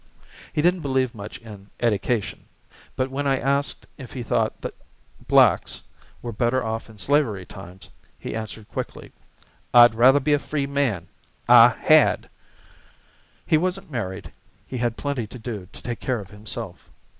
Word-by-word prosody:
He 150 - -1
didn't 180 +1 +3
believe 130 -4 0
much 105 -2 -8
in 105 -3 -13
"edication;" 115 -1 -1 0.5
but 130 0 -1
when 140 +1 -2
I 135 -1 +2
asked 140 +2 -1
if 130 -3 -9
he 125 - -5
thought 115 - 0
the - - -5 0.5
blacks - - +4 0.4
were 120 - -4
better 120 +4 0
off 110 0 -4
in 110 - -14
slavery 110 -5 +1
times, 95 0 -12 0.3
he - - -6
answered 110 -1 -6
quickly, - - -6 0.6
"I'd 120 -1 +9
rather 130 +5 +6
be 150 +2 +1
a 145 - +3
free 145 -1 -2
man, 135 -11 -1 0.4
I 120 0 +9
had." 155 -1 +4 1.1
He 155 - +3
wasn't 185 0 -2
married; 95 - -5 0.3
he 130 - -5
had 120 -1 -1
plenty 140 -6 -3
to 125 - -10
do 110 -5 -6
to - - -13
take 120 -2 -4
care 130 -3 -1
of 100 -1 -11
himself. 105 +1 -8
120 Hz, 155 wpm, -24 LUFS, 110-140 Hz, 1.1 s, I'd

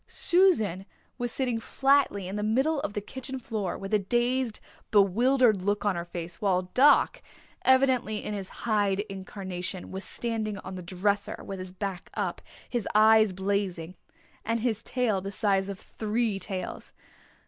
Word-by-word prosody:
Susan 220 - +2 0.3
was 245 -1 -2
sitting 245 -4 -1
flatly 270 -7 +2
in 190 - -5
the 210 - -2
middle 265 +9 +1
of 275 -7 -3
the 205 - -2
kitchen 265 +4 -6
floor 220 -6 -3
with 195 +2 -7
a 210 - +5
dazed, 240 +3 0 0.3
bewildered 220 +2 +4
look 205 +2 -1
on 205 -2 +2
her 170 0 -3
face, 175 +2 -7
while 185 -3 +2
Doc, 295 - +5 0.4
evidently 260 -5 +3
in 210 - -3
his 195 -2 -5 0.2
Hyde 205 -3 +2
incarnation, 190 -2 -6
was 190 +1 -5
standing 220 -3 -2
on 190 0 -8
the 185 - -6
dresser, 200 +3 -1
with 195 -1 -6
his 185 0 -7
back 190 -1 -5
up, - - -2 0.3
his 240 -5 -2
eyes 215 -1 +6
blazing, 190 -3 -2 0.5
and 230 +1 -1
his 230 -2 0
tail 230 -6 0
the 195 - -5
size 195 -1 +1
of 200 -1 -6
three 220 -1 -2
tails. 185 -1 -5
210 Hz, 160 wpm, -28 LUFS, 190-240 Hz, 0.5 s, eyes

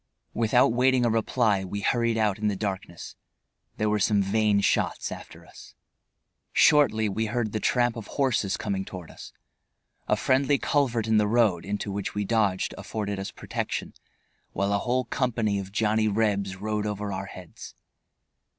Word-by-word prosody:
Without 115 +1 +3
waiting 125 0 +3
a 115 - +2
reply 110 -3 +1
we 100 +2 -5
hurried 115 +1 +1
out 105 -2 +1
in 105 - 0
the 105 - 0
darkness. 95 -4 -5 0.6
There 105 - 0
were 105 0 +1
some 105 +1 +2
vain 105 +1 +2
shots - - 0
after - - -10
us. - - -15 0.8
Shortly 110 -8 +4
we 110 +2 -1
heard 120 -1 -1
the 110 - -2
tramp 120 +1 +1
of 115 -3 -7
horses 120 -8 0
coming 100 -2 -2
toward 90 -4 -9
us. - - -11 0.8
A - - +3
friendly 140 +2 +2
culvert 125 -8 +1
in 110 -1 +3
the 105 -1 +3
road 105 -6 +2
into 100 0 -3
which 100 +1 -4
we 105 0 -1
dodged 100 -3 +1
afforded 100 -2 -4
us 95 +1 -4
protection - - -4 0.6
while 100 +1 0
a 100 - +2
whole 125 +4 0
company 115 -6 0
of 95 0 -7
Johnny 110 +1 +1
Rebs 100 -2 0
rode 105 +2 -2
over 105 -1 -3
our 95 +1 -4
heads. 90 -2 -11
105 Hz, 165 wpm, -26 LUFS, 100-115 Hz, 0.8 s, Shortly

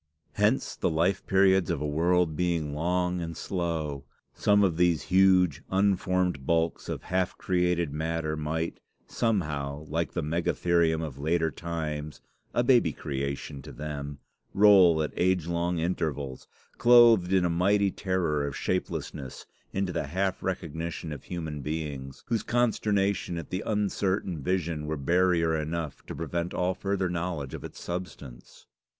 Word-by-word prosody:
Hence, 105 +6 +1
the - - 0
life 85 +4 0
periods 95 -1 +4
of 85 -4 0
a 75 - -2
world 85 +2 +2
being 85 -4 -1
long 90 +3 0
and 85 -1 -5
slow, 80 -6 -3 0.3
some 105 0 +3
of 90 -5 +2
these 85 -3 +3
huge, 95 -5 +5
unformed 95 -5 +1
bulks 85 0 0
of - - -4
half 90 0 -1
created 90 -4 0
matter 80 0 -2
might, 80 +2 -3 0.3
somehow, 75 -9 -1
like 85 +3 -1
the - - -2
megatherium 85 0 +1
of 70 -4 -6
later 80 +2 +1
times, 75 -2 -4 0.3
a 120 - +1
baby 120 - +4
creation 70 0 -4
to - - -10
them, 75 -1 -6 0.4
roll 95 -6 +6
at 75 - -4
age 90 -2 +1
long 85 +1 -1
intervals, 80 -6 -2 0.3
clothed 120 -6 +6
in 95 -2 +3
a - - +3
mighty 100 +4 +2
terror 85 -8 -1
of 70 - -5
shapelessness 70 -7 -3 0.3
into 95 -2 -1
the 80 -4 -2
half 95 +4 -1
recognition 85 -3 -4
of 70 - -10
human 80 -4 -5
beings, 70 -3 -5
whose 115 -2 0
consternation 100 -6 0
at 85 - -7
the 95 - -2
uncertain 100 -5 -1
vision 85 -2 -1
were 80 0 -2
barrier 85 +2 +2
enough 80 -1 -4
to - - -6
prevent 85 +1 -3
all 90 +1 +1
further 95 -1 -1
knowledge 85 -5 -3
of - - -6
its - - -9
substance." 85 -8 -8
85 Hz, 145 wpm, -28 LUFS, 75-95 Hz, 0.4 s, roll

